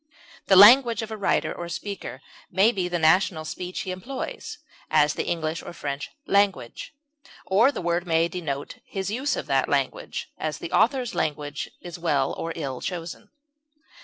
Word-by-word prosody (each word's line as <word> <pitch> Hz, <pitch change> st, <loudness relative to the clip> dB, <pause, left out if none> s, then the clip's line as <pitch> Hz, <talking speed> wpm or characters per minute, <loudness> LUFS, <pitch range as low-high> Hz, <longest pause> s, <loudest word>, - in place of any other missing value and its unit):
The 190 Hz, -, +6 dB
language 230 Hz, +4 st, +8 dB
of 220 Hz, -, -7 dB
a -, -, -3 dB
writer 200 Hz, -2 st, 0 dB
or 170 Hz, 0 st, -6 dB
speaker 170 Hz, -6 st, -6 dB, 0.3 s
may 195 Hz, +5 st, +4 dB
be 185 Hz, -6 st, -2 dB
the 175 Hz, 0 st, -1 dB
national 160 Hz, 0 st, +3 dB
speech 180 Hz, +3 st, -5 dB
he 185 Hz, -, -4 dB
employs; 240 Hz, +9 st, -6 dB, 0.3 s
as, 150 Hz, 0 st, +4 dB
the -, -, -3 dB
English 160 Hz, -1 st, -2 dB
or -, -, -9 dB
French 140 Hz, -3 st, -4 dB, 0.2 s
language; 200 Hz, -, 0 dB, 0.5 s
or 220 Hz, +8 st, +4 dB
the 235 Hz, -, -6 dB
word 170 Hz, +1 st, 0 dB
may 165 Hz, 0 st, +3 dB
denote 160 Hz, -5 st, -5 dB
his 195 Hz, 0 st, -3 dB
use 265 Hz, +6 st, 0 dB
of -, -, -4 dB
that -, -, +1 dB
language; -, -, -2 dB
as, -, -, -2 dB
the -, -, -7 dB
author's 250 Hz, -1 st, +2 dB
language 145 Hz, -1 st, -2 dB
is 175 Hz, 0 st, -8 dB
well 145 Hz, -5 st, +1 dB
(or 165 Hz, -, -4 dB
ill) 135 Hz, -6 st, -4 dB
chosen. 170 Hz, -2 st, -6 dB
180 Hz, 165 wpm, -25 LUFS, 160-205 Hz, 0.5 s, language